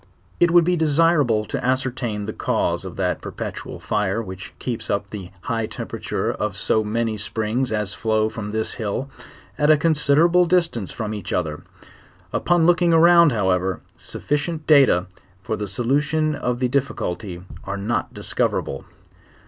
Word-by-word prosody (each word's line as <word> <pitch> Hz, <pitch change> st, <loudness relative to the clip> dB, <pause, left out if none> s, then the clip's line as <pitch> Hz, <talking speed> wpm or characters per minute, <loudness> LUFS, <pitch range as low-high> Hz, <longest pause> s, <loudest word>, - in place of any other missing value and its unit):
1't 175 Hz, -, +6 dB
would 170 Hz, 0 st, +6 dB
be 180 Hz, +2 st, +2 dB
deferable 150 Hz, -8 st, +3 dB
to -, -, -4 dB
ascertain 125 Hz, -5 st, -1 dB
the 110 Hz, -, -4 dB
cause -, -, -1 dB
of -, -, -7 dB
that -, -, -1 dB
per -, -, -6 dB
petual -, -, -6 dB
lire 105 Hz, +1 st, +1 dB
which 95 Hz, -4 st, -7 dB
keeps 120 Hz, -3 st, -4 dB
up 100 Hz, 0 st, -1 dB
the 95 Hz, -4 st, -7 dB
high 115 Hz, -1 st, -2 dB
temperature -, -, -3 dB
of -, -, -3 dB
so 110 Hz, -, +2 dB
many 110 Hz, +1 st, -1 dB
springs 110 Hz, +4 st, -1 dB
as 105 Hz, -2 st, -1 dB
flow 110 Hz, -1 st, +1 dB
from 110 Hz, -1 st, -6 dB
this 110 Hz, +1 st, -2 dB
hill, 115 Hz, +5 st, -3 dB, 0.5 s
at 150 Hz, 0 st, +3 dB
a 155 Hz, -, +7 dB
considerate 165 Hz, +3 st, +3 dB
distance 165 Hz, -, +1 dB
from. 110 Hz, -2 st, -4 dB
*?nch 105 Hz, -4 st, -6 dB
other: 75 Hz, -4 st, -2 dB, 0.7 s
upon 175 Hz, -2 st, +2 dB
looking 175 Hz, 0 st, +4 dB
around, 170 Hz, -1 st, +6 dB
ho 105 Hz, -5 st, 0 dB
vfrevfir, 95 Hz, 0 st, +1 dB, 0.2 s
sufficient 155 Hz, +2 st, -3 dB
data 135 Hz, -, +5 dB, 0.4 s
fur 110 Hz, -, -2 dB
the 105 Hz, -1 st, -4 dB
solution 150 Hz, -, 0 dB
of 125 Hz, -4 st, -2 dB
the 125 Hz, 0 st, +1 dB
difficulty 105 Hz, -9 st, -2 dB, 0.2 s
are 100 Hz, +1 st, -3 dB
not 105 Hz, +4 st, -2 dB
discoverable. -, -, -2 dB
120 Hz, 155 wpm, -22 LUFS, 105-155 Hz, 0.7 s, a